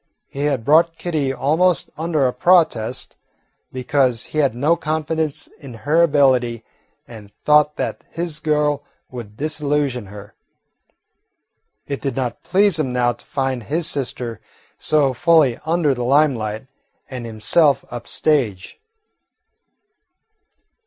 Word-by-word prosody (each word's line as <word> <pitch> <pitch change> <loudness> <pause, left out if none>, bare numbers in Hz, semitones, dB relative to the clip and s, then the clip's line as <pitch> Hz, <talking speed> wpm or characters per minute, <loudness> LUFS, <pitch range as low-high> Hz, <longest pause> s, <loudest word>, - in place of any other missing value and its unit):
He 140 +1 -4
had 135 -6 -1
brought 165 +3 +4
Kitty 155 -6 -1
almost 160 +5 +1
under 160 -3 0
a 125 - +1
protest, 155 -10 +1 0.5
because 130 -2 0
he 155 - -4
had 140 -6 +2
no 150 +7 +2
confidence 155 -1 -2
in 135 -6 -10
her 145 +9 +1
ability 130 -7 +2 0.4
and 105 -4 -12
thought 150 0 +4
that - - -4
his 165 -2 -3
"girl" 150 -2 0 0.3
would 115 -4 -9
disillusion 145 -6 -1
her. 100 +1 -11 1.5
It 140 - -5
did 135 -4 -3
not 125 -3 -3
please 190 -2 +2
him 135 -5 -1
now 120 -1 +1
to - - -16
find 135 -2 -2
his 155 +8 -1
sister 125 -6 -3 0.4
so 145 -4 +2
fully 160 -5 +3
under 160 -3 +2
the 125 -1 -4
limelight 125 -5 +1 0.4
and 125 -3 -7
himself 135 +6 +2
"up 120 -1 -7
stage." 125 - -1
140 Hz, 125 wpm, -20 LUFS, 125-155 Hz, 1.5 s, brought